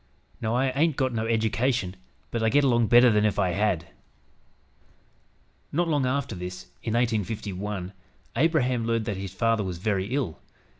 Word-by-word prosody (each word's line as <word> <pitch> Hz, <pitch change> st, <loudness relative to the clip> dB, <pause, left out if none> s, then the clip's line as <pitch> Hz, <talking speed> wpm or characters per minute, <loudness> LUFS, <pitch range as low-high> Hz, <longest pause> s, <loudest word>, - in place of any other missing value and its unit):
Now 110 Hz, 0 st, 0 dB
I 130 Hz, +1 st, +2 dB
haint 150 Hz, +3 st, +2 dB
got 130 Hz, -2 st, 0 dB
no 110 Hz, 0 st, -1 dB
eddication, 115 Hz, -2 st, 0 dB, 0.4 s
but 115 Hz, -, -2 dB
I 110 Hz, -, +3 dB
git 145 Hz, +4 st, +4 dB
along 120 Hz, -4 st, +3 dB
better 120 Hz, +1 st, +7 dB
than 105 Hz, -1 st, +3 dB
if 105 Hz, -1 st, +1 dB
I 95 Hz, -3 st, +2 dB
had." 95 Hz, -3 st, 0 dB, 1.9 s
Not 175 Hz, +3 st, +1 dB
long 145 Hz, -5 st, +1 dB
after 130 Hz, -2 st, -1 dB
this, 90 Hz, 0 st, -6 dB, 0.2 s
in 110 Hz, -, -3 dB
1851, 105 Hz, -4 st, -2 dB, 0.4 s
Abraham 130 Hz, -5 st, +2 dB
learned 115 Hz, -1 st, 0 dB
that 105 Hz, -4 st, -3 dB
his 95 Hz, -1 st, -5 dB
father 115 Hz, +3 st, +1 dB
was 90 Hz, -3 st, -4 dB
very 95 Hz, +1 st, -1 dB
ill. 125 Hz, -, -2 dB
115 Hz, 160 wpm, -26 LUFS, 100-125 Hz, 1.9 s, better